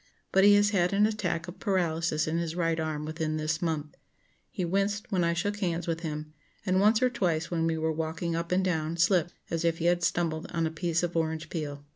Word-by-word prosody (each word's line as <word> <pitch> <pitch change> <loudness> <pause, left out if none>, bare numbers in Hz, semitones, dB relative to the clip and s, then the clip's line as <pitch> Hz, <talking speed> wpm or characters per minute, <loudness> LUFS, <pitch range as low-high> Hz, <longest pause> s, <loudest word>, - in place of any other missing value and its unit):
But 195 - +4
he 205 0 +8
has 205 0 +4
had 180 -2 +2
an 205 +1 +4
attack 180 -6 -1
of 175 - -9
paralysis 165 -5 0
in 165 +2 0
his 165 -1 -3
right 165 -2 0
arm 155 -1 -2
within 155 0 -2
this 155 +1 -1
month. 155 -3 -2 0.5
He 185 -5 -3
winced 200 +4 -1
when 185 -3 +2
I 170 0 +2
shook 205 +4 -1
hands 175 -3 -1
with 165 -1 -2
him, 155 -2 -5 0.3
and 185 -1 +2
once 215 +4 +4
or 255 - +4
twice 170 -8 -1
when 165 -1 +1
we 165 -1 0
were 160 0 0
walking 165 +1 -2
up 170 +1 -3
and 185 +1 +2
down 165 -2 -1
slipped 175 0 +2 0.2
as 165 0 -1
if 165 -1 +1
he 165 - -3
had 175 0 +3
stumbled 165 -2 0
on 165 -1 0
a 160 - -1
piece 170 +1 -1
of 175 -1 -2
orange 160 -1 -1
peel. 145 -3 -5
170 Hz, 230 wpm, -28 LUFS, 160-185 Hz, 0.5 s, he